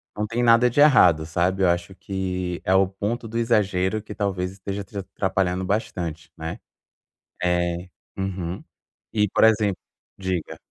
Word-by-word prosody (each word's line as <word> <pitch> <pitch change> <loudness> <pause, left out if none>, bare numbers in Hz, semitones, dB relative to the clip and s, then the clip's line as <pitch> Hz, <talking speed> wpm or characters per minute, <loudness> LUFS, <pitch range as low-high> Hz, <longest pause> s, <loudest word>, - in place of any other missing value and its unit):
não 105 0 -2
tem 120 +2 -1
nada 120 +1 +6
de 130 - -1
errado, 90 - +6
sabe, 90 +4 0
eu 90 - +5
acho 85 +2 -1
que 95 -2 -3
é 95 - +2
o 95 0 +5
ponto 110 +5 -3
do 115 +2 -4
exagero 105 -3 +1
que 105 - -9
talvez 95 -3 -2
esteja 100 +1 -5
te 100 +1 -10
atrapalhando 95 -1 -1
bastante, 85 -6 -3
né. 80 0 -5 0.8
É 85 0 0 0.3
uhum. 95 -2 -4 0.5
E, 105 -1 +3
por - - +2
exemplo 105 -3 +4 0.4
diga. 95 -4 -3
95 Hz, 150 wpm, -24 LUFS, 90-105 Hz, 0.8 s, nada